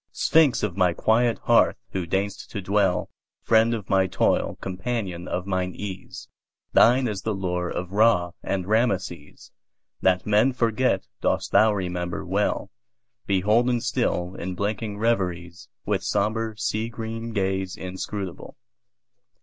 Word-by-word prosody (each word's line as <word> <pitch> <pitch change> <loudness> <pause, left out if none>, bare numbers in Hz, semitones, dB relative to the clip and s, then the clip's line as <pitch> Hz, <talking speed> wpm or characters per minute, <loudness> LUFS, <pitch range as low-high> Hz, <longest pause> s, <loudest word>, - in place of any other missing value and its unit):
Sphinx 155 -6 +3
of 100 -5 -1
my 90 -3 +3
quiet 115 +4 +2
hearth! - - +4
who 90 -3 -3
deign'st 100 +3 -2
to - - -5
dwellFriend 105 +4 +1
of 105 -4 -7
my 95 -1 +3
toil, - - +1
companion 95 -2 -4
of 90 - -3
mine 95 -2 -2
ease, 95 -2 -7 0.5
Thine 125 +2 +5
is 105 -3 -3
the 110 -2 -2
lore 90 -2 -2
of 90 +1 -4
Ra 100 -4 +3
and 95 -2 -2
Rameses; 95 -8 -1 0.5
That 90 -1 +2
men 105 +5 +3
forget 125 +1 +1 0.2
dost - - 0
thou 110 0 +5
remember 90 -3 -3
well, 100 +4 -1 0.6
Beholden 110 +6 +2
still 120 -7 -1
in 90 0 -5
blinking 105 +1 -3
reveriesWith 90 -6 -2
sombre, 110 0 -1
sea 110 +2 -1
green 115 0 -5
gaze 95 -2 -1
inscrutable. 95 0 -6
100 Hz, 125 wpm, -25 LUFS, 90-115 Hz, 0.6 s, Thine